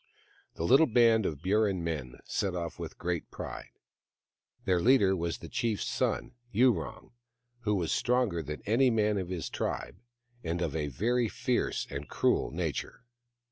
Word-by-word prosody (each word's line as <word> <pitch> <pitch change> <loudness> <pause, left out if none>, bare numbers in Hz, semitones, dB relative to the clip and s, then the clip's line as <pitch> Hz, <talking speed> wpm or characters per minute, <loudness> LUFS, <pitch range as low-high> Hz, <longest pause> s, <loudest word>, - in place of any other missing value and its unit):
The - - -3
little 135 - +6
band 115 -3 +4
of 75 -1 -5
Burrin 100 -2 +2
men 70 -7 -3
set 95 -2 -1
off 85 -2 -4
with - - -6
great 85 -1 -3
pride. - - -7 1.0
Their 90 -2 +2
leader 110 -5 +5
was 85 -1 -2
the - - -10
chief's 115 -3 -1
son, - - -1 0.2
Yurong, 115 -1 +1 0.5
who 105 -1 +2
was 85 -4 -1
stronger 120 -9 +1
than 75 0 -6
any 120 +5 +4
man 105 -3 +2
of 90 -2 -4
his 85 -3 -3
tribe, - - -3 0.5
and 85 +1 -2
of 80 -3 -2
a 75 -2 -1
very 115 - +1
fierce 125 +2 -1
and 70 +1 -5
cruel - - +2
nature. 80 +5 -4
95 Hz, 155 wpm, -30 LUFS, 85-115 Hz, 1.0 s, little